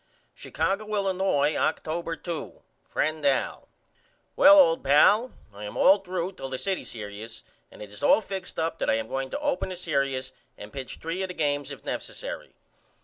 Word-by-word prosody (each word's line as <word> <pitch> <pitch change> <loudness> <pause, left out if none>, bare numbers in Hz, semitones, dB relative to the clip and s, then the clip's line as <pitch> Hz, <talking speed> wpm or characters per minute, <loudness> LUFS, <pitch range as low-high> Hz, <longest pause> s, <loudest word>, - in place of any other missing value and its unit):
Chicago, 200 +2 -2
Illinois, 190 -7 +1
October 165 +1 -1
2. 170 -1 -6 0.3
FRIEND 155 0 -1
AL: 140 -2 0 0.7
Well 295 +1 +8
old 165 -12 +5
pal 200 - +5 0.2
I 105 +1 -8
am 105 - -7
all 195 +2 +6
threw 185 -1 -3
till 135 -8 -7
the 130 - -3
city 190 +6 -2
serious 110 +1 -8 0.3
and - - -11
it 105 - -11
is 105 - -9
all 145 - +5
fixed 190 -3 -6
up 165 0 -1
that - - 0
I - - +4
am 110 0 -2
going 135 +1 -3
to - - -4
open 290 -8 -1
the 185 - -5
serious 140 -6 -1 0.3
and 105 +1 -10
pitch 135 -2 -6
3 165 +4 -4
of 190 - -1
the 180 - -8
games 145 -2 0
if - - -9
nessary. - - -5
160 Hz, 180 wpm, -26 LUFS, 135-190 Hz, 0.7 s, Well